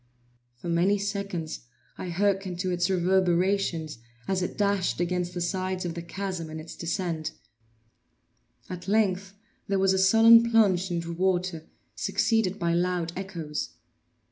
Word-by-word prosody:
For 125 - -9
many 175 +4 +2
seconds 200 - -4 0.3
I 180 - -6
hearkened 195 0 0
to 185 -1 -1
its 175 +1 +1
reverberations 180 - +1 0.3
as 190 -1 0
it 180 - -3
dashed 200 -4 +1
against 180 0 -1
the 175 - -2
sides 185 +1 -2
of 170 - -2
the 170 - -5
chasm 180 -1 -5
in 160 0 -6
its 160 +1 -9
descent; 170 -3 -3 1.3
at 180 0 -7
length 200 -2 +1 0.3
there 195 - +1
was 190 0 +3
a 190 - +1
sullen 225 +4 +7
plunge 195 -5 +3
into 170 -1 -3
water, 180 -2 -1 0.3
succeeded 220 -4 +1
by 170 -1 0
loud 175 -1 0
echoes. 170 -6 -5
185 Hz, 140 wpm, -27 LUFS, 170-195 Hz, 1.3 s, sullen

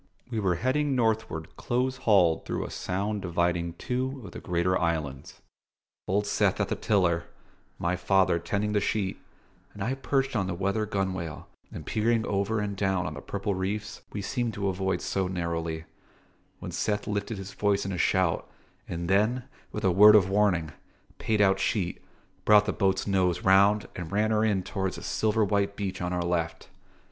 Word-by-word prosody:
We 115 - -1
were 95 -4 +1
heading 135 - 0
northward 110 -9 -1
close 130 +2 -1
hauled 95 -10 +3
through - - -3
a - - -7
sound 100 +3 -2
dividing 85 -1 0
two 130 +6 -3
of 95 - -9
the - - -8
greater 90 +1 0
islands 75 -6 -2 0.7
Old 100 +2 +1
Seth 100 - +1
at - - 0
the - - 0
tiller, 85 -5 +1 0.5
my 85 +1 0
father 95 -2 +2
tending 105 +4 -1
the 105 -1 +2
sheet, 100 -2 -1 0.6
and 100 - -4
I 120 +6 0
perched 135 0 -1
on 95 -4 +1
the 90 - -2
weather 100 +4 -1
gunwale 95 -6 -3 0.2
and - - -8
peering 110 +1 +1
over 100 +2 0
and 105 -1 -2
down 95 -2 0
on 75 - -3
the 70 - -8
purple 100 +4 -3
reefs 100 +2 -3
we 100 - -4
seemed 120 +1 -2
to 100 -1 -1
avoid 95 0 -1
so 95 -1 -1
narrowly 85 -3 -3 0.7
when - - -7
Seth 105 -1 -1
lifted 105 +1 -2
his 95 +1 -7
voice 100 -1 +1
in 100 - -3
a 90 - -3
shout, 95 -3 +1 0.4
and 85 0 -4
then, 110 +7 +2 0.3
with - - -5
a 95 - +4
word 105 +4 +8
of 100 -4 +6
warning, 95 -6 +2 0.5
paid 110 -2 +1
out 95 -1 +4
sheet, 95 -2 -1 0.4
brought 105 -1 +6
the 105 - -1
boat's 95 -2 +1
nose 90 -3 +1
round 100 +2 +4
and 85 -2 -6
ran 105 +2 +1
her 110 0 +2
in 100 -4 +1
towards 95 -1 -3
a - - -8
silver 110 0 +1
white 100 0 0
beach 100 -3 -4
on 90 0 -2
our 90 -1 -1
left. 85 -1 -2
100 Hz, 180 wpm, -27 LUFS, 90-105 Hz, 0.7 s, word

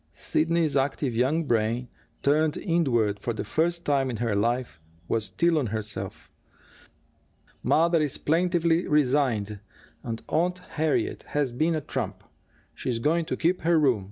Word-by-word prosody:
Sidney's 160 -2 +1
active 135 -1 0
young 145 +7 +1
brain, 115 0 0 0.4
turned 150 +2 +2
inward 120 - +1
for 120 +3 -2
the 110 - -4
first 170 +2 0
time 135 -2 +2
in 120 - -3
her 115 -2 0
life, 115 -4 -1 0.3
was 110 -2 0
still 170 +3 +1
on 130 - -1
herself. 105 0 -5 1.3
"Mother 165 0 +3
is 150 -3 -1
plaintively 170 +1 +1
resigned 125 -8 +1 0.4
and 115 -1 -5
Aunt 175 +4 +1
Harriet 155 -1 0 0.2
has 140 -4 +1
been 160 +7 +1
a 155 - -1
trump. - - -4 0.5
She's 125 -3 -3
going 160 +8 +1
to - - -3
keep 175 +3 +1
her 165 +1 +3
room. 130 -7 +3
145 Hz, 145 wpm, -26 LUFS, 120-165 Hz, 1.3 s, Mother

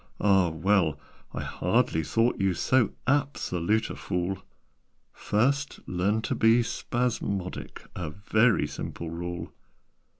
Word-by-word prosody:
Ah, 95 -3 +4
well! 85 0 +1 0.3
I - - -4
hardly 80 - +1
thought 115 +9 +1
you 95 -2 +2
So 120 +4 +2
absolute 110 -8 0
a - - -6
fool. 90 +2 -2 0.7
First 140 +7 0
learn 100 +5 0
to - - -1
be 115 +2 +4
spasmodic 115 -6 -3
A 85 -4 -3
very 105 +3 +2
simple 75 +3 -6
rule. 85 0 -5
95 Hz, 110 wpm, -27 LUFS, 85-115 Hz, 0.7 s, Ah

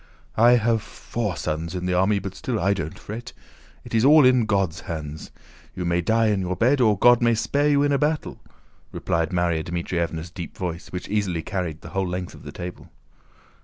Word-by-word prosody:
"I 120 +2 +6
have 115 -2 +2
four 105 -3 -4
sons 80 +3 -3
in 90 0 -3
the 90 - 0
army 95 +3 +3
but 95 -1 -5
still 115 +2 -3
I 100 +3 +2
don't 80 -5 -5
fret. 110 +3 -8 0.5
It - - -11
is 110 0 +3
all 150 +1 +7
in 125 -3 +4
God's 95 -5 0
hands. 80 -4 -6 0.5
You 90 - -3
may 85 0 +1
die 110 +4 +2
in 100 -2 +1
your 90 0 -2
bed 130 +8 +3
or 110 -4 +4
God 120 +3 +5
may 115 -1 +3
spare 145 +6 +1
you 145 -1 +3
in 145 - +2
a 140 - +2
battle," 150 +1 -1 0.5
replied 85 0 -1
Márya 85 -3 0
Dmítrievna's 85 -1 -3
deep 85 0 -8
voice, 85 -2 -4
which 90 - -5
easily 95 -6 -1
carried 85 -5 -4
the 85 - -10
whole 95 +2 -1
length 90 0 -4
of - - -13
the - - -9
table. 90 0 -8
95 Hz, 200 wpm, -24 LUFS, 85-115 Hz, 0.5 s, all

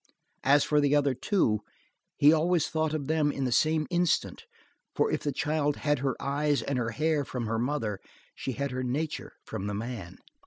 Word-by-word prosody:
As 140 +2 +5
for 150 -1 +2
the 145 0 +3
other 140 -2 +3
two, 130 - +1 0.6
he 150 +2 +7
always 165 +1 +2
thought 155 0 -1
of 145 -3 -3
them 155 0 +2
in 140 - -3
the 125 - -1
same 155 +4 +2
instant, 175 -1 0 0.5
for - - +2
if - - -1
the 145 - -1
child 150 -1 0
had 145 -2 0
her 135 -1 -1
eyes 145 +1 0
and 140 -2 -1
her 115 -2 -1
hair 155 +3 0
from 125 -3 -4
her 110 +1 -1
mother, 120 -6 -1 0.3
she 130 - -4
had 140 +2 -3
her 130 0 -3
nature 145 +5 -3
from 95 - -5
the 105 - -2
man. 105 -5 -6
145 Hz, 195 wpm, -28 LUFS, 125-155 Hz, 0.6 s, he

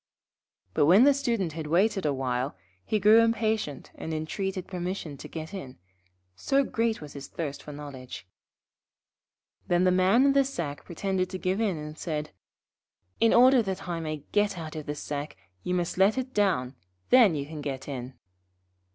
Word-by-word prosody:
But 145 - +3
when 190 +8 +7
the 285 +1 +6
Student 230 - -1
had 160 -1 -5
waited 190 +2 +2
a - - +2
little, 130 -1 -2 0.3
he 215 - 0
grew 210 +3 +7
impatient 220 - 0
and 160 - -5
entreated 185 +4 -3
permission 180 -4 -4
to - - -9
get 160 +3 -7
in, 135 -10 -7 0.6
so 270 - +2
great 230 -5 -1
was 150 -1 -9
his 140 -1 -8
thirst 145 -4 -5
for 150 - -9
knowledge. 140 -8 -9 1.4
Then 175 0 +3
the 185 - +4
Man 190 +8 +4
in 275 - +4
the 275 0 +5
sack 170 - -5
pretended 185 +1 -2
to 185 - -4
give 185 +3 -1
in, 200 -7 0
and 150 +1 -8
said: 155 -2 -3 0.9
'In 230 - +4
order 255 +1 +6
that 190 -3 -4
I 170 -1 -2
may 155 -3 -4
get 205 -2 +1
out 160 -1 -6
of 155 -2 -6
the 145 - -3
sack 145 0 -5 0.2
you 180 - -2
must 175 +1 -2
let 200 +4 +4
it 260 0 -3
down, 175 -12 +1 0.4
then 235 -9 +7
you 140 -1 -3
can 150 0 -7
get 135 -2 -5
in.' 130 -2 -6
175 Hz, 175 wpm, -27 LUFS, 150-210 Hz, 1.4 s, when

